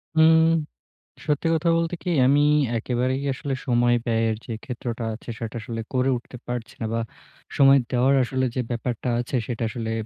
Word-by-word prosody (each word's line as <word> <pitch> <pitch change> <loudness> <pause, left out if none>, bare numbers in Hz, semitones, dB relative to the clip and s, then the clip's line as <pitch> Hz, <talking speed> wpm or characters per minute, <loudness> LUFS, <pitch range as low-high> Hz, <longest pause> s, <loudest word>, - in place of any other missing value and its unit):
উম 160 0 +6 0.8
সত্যি 150 +1 0
কথা 165 +1 0
বলতে 165 +1 0
কি? 180 - -2 0.2
আমি 140 +2 +4 0.4
একেবারেই 125 +3 -1
আসলে 135 +1 -3
সময় 120 -1 +3
ব্যয়ের 115 -1 +1
যে - - -5
ক্ষেত্রটা 120 -2 -5
আছে 110 - -13
সেটা 115 0 -5
আসলে 115 0 -5
করে 130 +1 +2
উঠতে 125 +1 -9
পারছি 120 -1 -5
না 115 - -2
বা 115 - 0 0.6
সময় 135 0 +7
দেওয়ার 130 +1 +3
আসলে 130 +1 -1
যে 130 - 0
ব্যাপারটা 120 +1 -3
আছে 120 +2 -3
সেটা 120 -2 -4
আসলে 110 0 -4
125 Hz, 165 wpm, -24 LUFS, 120-140 Hz, 0.8 s, সময়